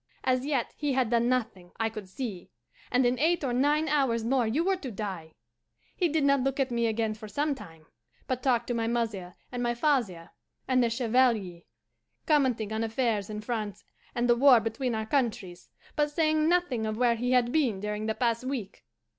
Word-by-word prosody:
As 255 +1 +1
yet 275 -6 -1
he 290 -2 -1
had 255 -3 +1
done 235 0 +2
nothing, 205 -8 -2
I 225 - +2
could 215 -4 -8
see, 200 -4 -6 0.4
and 250 0 +2
in 245 +1 +1
eight 325 +2 +2
or 255 -3 -1
nine 295 +5 +2
hours 270 -6 +1
more 245 0 +1
you 275 +10 +1
were 385 +2 +2
to 280 -7 -6
die. 190 -7 -6 0.6
He 350 -3 +1
did 310 -1 +1
not 280 -1 +3
look 270 +1 -1
at 265 -2 +1
me 235 -1 +1
again 220 -1 0
for 215 0 -10
some 290 +7 -1
time, 165 - -12 0.4
but 255 -1 -2
talked 240 -3 +2
to - - +1
my 230 -1 -1
mother 215 -7 -2 0.2
and 245 - -4
my 240 0 0
father 235 - 0 0.4
and 255 -1 +3
the 235 - +2
Chevalier, 230 -7 +1 0.6
commenting 250 -8 +1
on 220 +1 -1
affairs 225 -3 -1
in 210 0 -5
France 215 -2 -4 0.3
and 240 0 +1
the 240 - +5
war 255 -1 +7
between 230 +2 -2
our 220 0 -2
countries, 225 -8 -2 0.3
but 295 -1 +1
saying 310 +1 +2
nothing 290 -11 +1
of 215 0 -3
where 240 -1 +3
he 245 +2 -1
had 245 -1 +3
been 250 -10 +1
during 210 +1 -3
the 220 - -1
past 235 -1 0
week. 255 -7 -5
240 Hz, 200 wpm, -28 LUFS, 220-270 Hz, 0.6 s, war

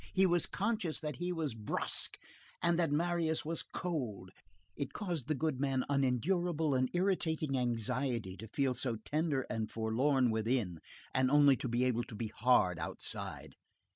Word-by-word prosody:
He 190 - +5
was 175 -2 +3
conscious 205 -5 -1
that 150 -4 -4
he 175 +1 -2
was 160 -7 -2
brusque, 110 -2 -2 0.4
and 170 0 +2
that 165 -4 +2
Marius 165 0 +1
was 165 +1 -1
cold. 125 - -4 0.4
It 140 - -4
caused 175 - -3
the 155 - +1
goodman 135 -3 0
unendurable 150 +4 +1
and 130 -1 +2
irritating 165 -6 +1
anxiety 120 -3 -1
to 110 +5 -8
feel 135 +3 +1
so 120 -1 -1
tender 150 -3 0
and 110 -1 -2
forlorn 125 +3 +2
within, 110 -6 0 0.3
and 130 0 +3
only 145 -1 +6
to - - -3
be 120 +1 +1
able 120 -2 +1
to 115 - -10
be 110 0 -3
hard 110 -8 +3
outside. 80 - -5
135 Hz, 155 wpm, -34 LUFS, 120-160 Hz, 0.4 s, only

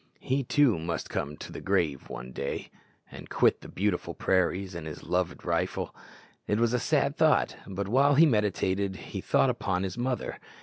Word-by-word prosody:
He, 135 +1 0
too, 125 - +3
must 85 0 -4
come 75 +1 -3
to - - -8
the - - -7
grave 85 -8 0
one 60 +1 -7
day, 70 +2 -4 0.4
and - - -10
quit - - +3
the - - -10
beautiful 95 -2 -1
prairies 95 0 +1
and 85 -2 -6
his 75 - -8
loved 90 -1 -1
rifle. - - -1 0.5
It 105 - +1
was 120 0 +2
a 125 - +2
sad 140 +1 +1
thought; 160 -2 +3
but 100 0 -3
while 140 +6 +4
he 160 +4 +8
meditated 100 - +1
he - - -6
thought - - +3
upon 90 0 -1
his 95 +4 -4
mother. 125 0 -2
100 Hz, 180 wpm, -28 LUFS, 90-125 Hz, 0.5 s, he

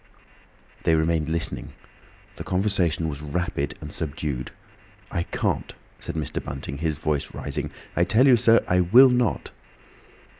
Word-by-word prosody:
They 80 - +3
remained 80 -1 +1
listening. 80 0 -2 0.6
The - - -6
conversation 90 -4 0
was 75 -2 -5
rapid 75 -1 -3
and - - -6
subdued. 70 -4 -3 0.6
"I 85 - -1
can't," - - -2 0.2
said - - -7
Mr. 80 -2 -3
Bunting, 70 0 -6
his 80 -1 -1
voice 75 -1 -2
rising; - - -4 0.3
"I 85 - +3
tell 110 +8 +4
you, 130 -3 +7
sir, 115 0 +4
I 90 - +3
will 120 +10 +7
not." 125 -4 0
80 Hz, 140 wpm, -24 LUFS, 75-95 Hz, 0.6 s, you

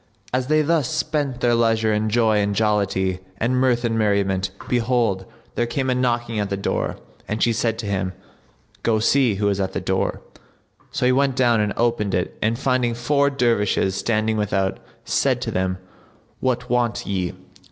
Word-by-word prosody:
As 130 0 0
they 155 +1 +3
thus 155 -4 +1
spent 150 -5 -1
their 120 -1 +3
leisure 115 -2 +2
in 105 +1 0
joy 110 -1 +3
and 100 0 0
jollity 100 -3 +1 0.2
and 120 +5 0
mirth 125 -2 +2
and 115 -1 0
merriment, 100 -2 +1 0.2
behold, 115 -5 +1 0.3
there 120 - 0
came 130 +2 -1
a - - +3
knocking 120 -3 0
at 100 -1 -1
the 100 - -2
door 100 - -2 0.3
and 105 +1 -1
she 120 - +3
said 115 0 0
to 115 - -5
him; 95 -2 -2 0.7
"Go 115 -2 +2
see 120 0 +3
who 100 +1 0
is 100 -1 0
at 95 -1 -1
the - - -1
door." - - -1 0.7
So - - -1
he 125 - +5
went 135 0 +2
down 120 -3 +3
and 105 -1 0
opened 115 -5 +1
it 90 0 -2
and 110 +2 +1
finding 125 -3 +1
four 140 +4 +2
Dervishes 115 -7 +1
standing 110 +2 0
without, 95 -2 0 0.3
said - - +1
to - - -3
them, 95 0 -1 0.6
"What 125 -1 -1
want 120 -2 0
ye?" 95 -3 -2
115 Hz, 180 wpm, -22 LUFS, 100-125 Hz, 0.7 s, he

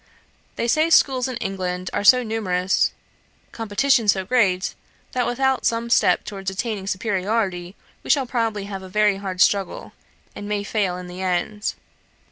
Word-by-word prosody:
They 235 - -2
say 310 +7 +2
schools 265 -5 +4
in 255 -2 -4
England 185 -4 -4
are - - -1
so 250 +4 +7
numerous, 190 -5 0 0.6
competition 230 +2 +1
so 190 -2 +2
great, 195 -5 +1 0.4
that 250 -1 0
without 265 +2 0
some 230 0 0
such - - +6
step - - +2
towards 195 -2 -5
attaining 200 0 -4
superiority, 190 -2 -1 0.3
we - - -11
shall 275 -3 +3
probably 225 -4 -1
have 195 -1 -6
a 190 - -10
very 210 0 +2
hard 190 -2 -4
struggle, 195 -2 +1 0.4
and 205 - -7
may 205 -1 -1
fail 200 -4 -1
in 180 - -8
the 180 +1 -8
end. 190 +3 -1
205 Hz, 160 wpm, -22 LUFS, 190-235 Hz, 0.6 s, so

